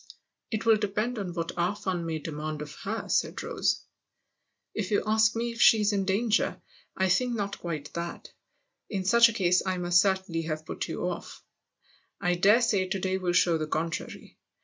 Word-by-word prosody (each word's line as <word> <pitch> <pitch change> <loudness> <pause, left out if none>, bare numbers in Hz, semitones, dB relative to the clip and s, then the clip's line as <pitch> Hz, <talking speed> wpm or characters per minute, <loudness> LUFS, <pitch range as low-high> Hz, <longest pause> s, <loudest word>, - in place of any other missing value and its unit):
" - - -56 0.2
It 220 0 -2
will 225 -1 +6
depend 215 +3 -2
on 190 -3 -4
what 165 -1 -2
our 180 +4 +1
fun 185 -5 -3
may 160 -1 -2
demand 155 0 -5
of 150 - -10
her," 220 +3 -3
said - - 0
Rose. - - -1 0.5
" - - -53
If 205 -4 -3
you 205 - +1
ask 220 +1 +3
me 235 +1 -1
if 230 +1 -5
she's 210 -2 +5
in 195 -1 0
danger, 215 +4 +1 0.4
I 190 - +2
think 240 +7 +1
not 200 -2 -3
quite 155 -4 -5
that: 170 0 -6 0.6
in 190 -3 -3
such 235 +4 +6
a - - -4
case 180 -4 +2
I 185 -1 -1
must 175 0 +4
cer 195 -1 +3
tainly 165 -4 -5
have 155 -1 -4
put - - -4
you - - -3
off. - - -6 0.8
I 175 - +1
dare 200 +7 +5
say 195 -5 +2
to 195 +1 -2
day 190 0 -1
will 180 -2 -1
show 170 -2 +3
the 155 - -2
contrary. 160 +1 -4
190 Hz, 200 wpm, -28 LUFS, 170-215 Hz, 0.8 s, will